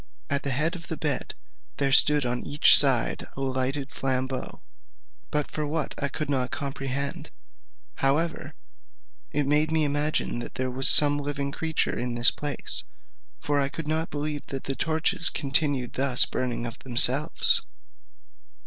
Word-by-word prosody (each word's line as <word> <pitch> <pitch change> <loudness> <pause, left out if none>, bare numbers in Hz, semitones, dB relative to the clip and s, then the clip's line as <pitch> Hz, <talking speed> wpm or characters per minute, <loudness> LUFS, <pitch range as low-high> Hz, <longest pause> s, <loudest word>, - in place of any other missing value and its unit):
At 140 0 +1
the 140 - -4
head 150 +7 -1
of 165 -3 -11
the 160 - -6
bed 145 -4 -3 0.4
there 140 -1 -1
stood 145 +1 +5
on 125 0 -2
each 145 +1 +5
side 135 -5 +4
a - - -6
lighted 135 +2 -3
flambeau, 130 -1 -4 0.7
but 150 -1 -2
for 150 -1 -4
what 155 0 -3
use - - -7
I - - 0
could 150 +2 -6
not 130 -3 -2
comprehend; 140 0 -5 0.7
however, 155 +5 -2 0.7
it 145 0 -2
made 150 +2 0
me 160 -1 +2
imagine 145 -3 -2
that - - -7
there 130 0 -4
was 130 +2 +5
some 145 -1 +7
living 140 -1 -4
creature 160 +1 -2
in 120 0 -4
this 120 +1 +2
place; 145 -1 -6 0.6
for 145 -1 -2
I 140 -1 -1
could 160 +1 -8
not 160 +2 -2
believe 150 0 -5
that 135 -2 -7
the 135 - -5
torches 165 +4 -1
continued 140 -3 -2
thus 135 -2 +5
burning 120 -2 -4
of 115 - -7
themselves. 130 +3 +4
140 Hz, 160 wpm, -24 LUFS, 130-150 Hz, 0.7 s, some